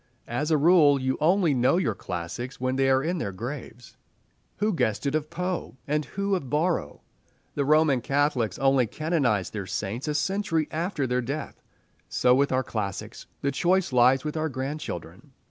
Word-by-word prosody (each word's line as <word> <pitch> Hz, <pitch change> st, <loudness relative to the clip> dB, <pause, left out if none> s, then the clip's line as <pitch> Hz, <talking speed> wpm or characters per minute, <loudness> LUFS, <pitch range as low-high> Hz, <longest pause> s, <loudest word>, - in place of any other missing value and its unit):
As 145 Hz, +6 st, -2 dB
a 155 Hz, -, +4 dB
rule, 150 Hz, -3 st, +5 dB
you 130 Hz, 0 st, 0 dB
only 170 Hz, 0 st, +3 dB
know 125 Hz, +6 st, +3 dB
your 160 Hz, -, +1 dB
classics 90 Hz, +8 st, -6 dB
when 130 Hz, +1 st, -1 dB
they 135 Hz, 0 st, +2 dB
are 130 Hz, 0 st, +3 dB
in 175 Hz, +2 st, -1 dB
their 100 Hz, -, -3 dB
graves. 120 Hz, +3 st, -8 dB, 0.6 s
Who 210 Hz, +1 st, +1 dB
guessed 110 Hz, -, 0 dB
it 140 Hz, -, 0 dB
of 155 Hz, 0 st, -1 dB
Poe, 180 Hz, -6 st, -4 dB
and 150 Hz, +1 st, 0 dB
who 200 Hz, 0 st, -2 dB
of 170 Hz, -9 st, -2 dB
Borrow? 150 Hz, -, -1 dB, 0.5 s
The 140 Hz, -, -1 dB
Roman 150 Hz, -3 st, +4 dB
Catholics 140 Hz, -4 st, 0 dB
only 135 Hz, -3 st, +3 dB
canonize 140 Hz, -, 0 dB
their 100 Hz, -3 st, -5 dB
saints 110 Hz, +10 st, -3 dB
a 150 Hz, -, -1 dB
century 190 Hz, -3 st, 0 dB
after 165 Hz, -3 st, -1 dB
their 125 Hz, 0 st, 0 dB
death. 140 Hz, +6 st, -5 dB, 0.5 s
So 125 Hz, -, +3 dB
with 140 Hz, +2 st, +2 dB
our 130 Hz, 0 st, +1 dB
classics. 105 Hz, -5 st, -5 dB
The 140 Hz, -, 0 dB
choice 175 Hz, +1 st, +1 dB
lies 125 Hz, +2 st, +5 dB
with 150 Hz, -, -3 dB
our 160 Hz, 0 st, -1 dB
grandchildren. 130 Hz, -, -6 dB
140 Hz, 175 wpm, -26 LUFS, 125-160 Hz, 0.6 s, rule